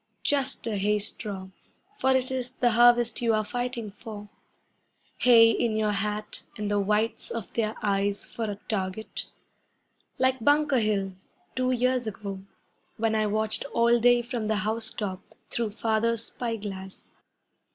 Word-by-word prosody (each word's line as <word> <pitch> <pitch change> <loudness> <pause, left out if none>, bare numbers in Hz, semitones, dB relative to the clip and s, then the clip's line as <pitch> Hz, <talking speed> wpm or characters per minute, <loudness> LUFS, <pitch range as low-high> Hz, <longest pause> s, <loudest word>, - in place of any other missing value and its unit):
Just 275 -2 0
a 220 -3 -1
hay 210 +2 +2
straw, 200 -2 -4 0.5
for 265 - +2
it 260 0 +1
is 255 -1 -3
the 245 -2 +2
harvest 240 +1 +5
you 230 -2 +3
are 215 0 0
fighting 245 -1 -3
for. 210 0 -9 0.9
Hay 230 -2 +7
in 225 -1 0
your 215 -1 +1
hat, 210 +1 -3 0.2
and 210 -1 -2
the 205 - +2
whites 210 +3 0
of 225 -6 -5
their 220 -1 0
eyes 200 0 0
for 230 - -4
a 205 -1 -3
target! 195 0 -3 0.9
Like 260 -2 +1
Bunker 290 -1 +4
Hill, 200 -3 0 0.4
two 255 0 +1
years 250 -1 +1
ago, 200 -2 -5 0.6
when 225 0 +1
I 215 -1 +2
watched 215 +1 0
all 235 0 +4
day 240 +1 +5
from 235 -3 -3
the 215 - +1
house 220 +1 0
top 190 -3 -4 0.3
Through 230 -2 0
Father's 225 +1 0
spy 235 -2 -3
glass. 190 -2 -8
220 Hz, 150 wpm, -27 LUFS, 210-240 Hz, 0.9 s, Hay